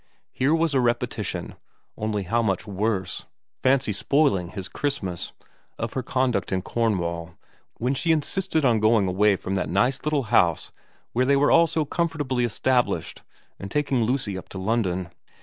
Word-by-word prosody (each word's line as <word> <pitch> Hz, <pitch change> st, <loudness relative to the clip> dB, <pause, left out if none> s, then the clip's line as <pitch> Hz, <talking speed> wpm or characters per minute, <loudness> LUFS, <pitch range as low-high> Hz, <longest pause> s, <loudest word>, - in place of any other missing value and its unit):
Here 140 Hz, +5 st, +2 dB
was 165 Hz, -2 st, +1 dB
a 135 Hz, -, +3 dB
repetition, 120 Hz, -1 st, -1 dB, 0.4 s
only 105 Hz, -2 st, -2 dB
how 115 Hz, +6 st, +1 dB
much 95 Hz, -5 st, -1 dB
worse 100 Hz, -2 st, -2 dB, 0.3 s
fancy 130 Hz, -4 st, +2 dB
spoiling 100 Hz, -, +2 dB
his 95 Hz, -1 st, -5 dB
Christmas 100 Hz, -, -3 dB, 0.5 s
of 115 Hz, 0 st, -4 dB
her 130 Hz, -, -1 dB
conduct 125 Hz, -8 st, 0 dB
in 95 Hz, -1 st, -1 dB
Cornwall 85 Hz, -8 st, -1 dB, 0.4 s
when 125 Hz, +3 st, 0 dB
she 165 Hz, +5 st, +1 dB
insisted 160 Hz, 0 st, +1 dB
on 115 Hz, -4 st, +4 dB
going 110 Hz, -2 st, +3 dB
away 100 Hz, +2 st, +3 dB
from 95 Hz, 0 st, -5 dB
that 95 Hz, -5 st, -1 dB
nice 125 Hz, +10 st, +2 dB
little 150 Hz, -2 st, +1 dB
house 85 Hz, -7 st, +3 dB, 0.4 s
where 125 Hz, +2 st, +2 dB
they 140 Hz, +2 st, +4 dB
were 140 Hz, +1 st, +3 dB
all 165 Hz, 0 st, +6 dB
so 160 Hz, -1 st, -1 dB
comfortably 145 Hz, -6 st, -1 dB
established, 125 Hz, +2 st, 0 dB, 0.4 s
and 100 Hz, -, -6 dB
taking 140 Hz, -2 st, 0 dB
Lucy 110 Hz, -5 st, -1 dB
up 90 Hz, -, -14 dB
to -, -, -8 dB
London. 95 Hz, -4 st, -1 dB
115 Hz, 160 wpm, -24 LUFS, 95-140 Hz, 0.5 s, all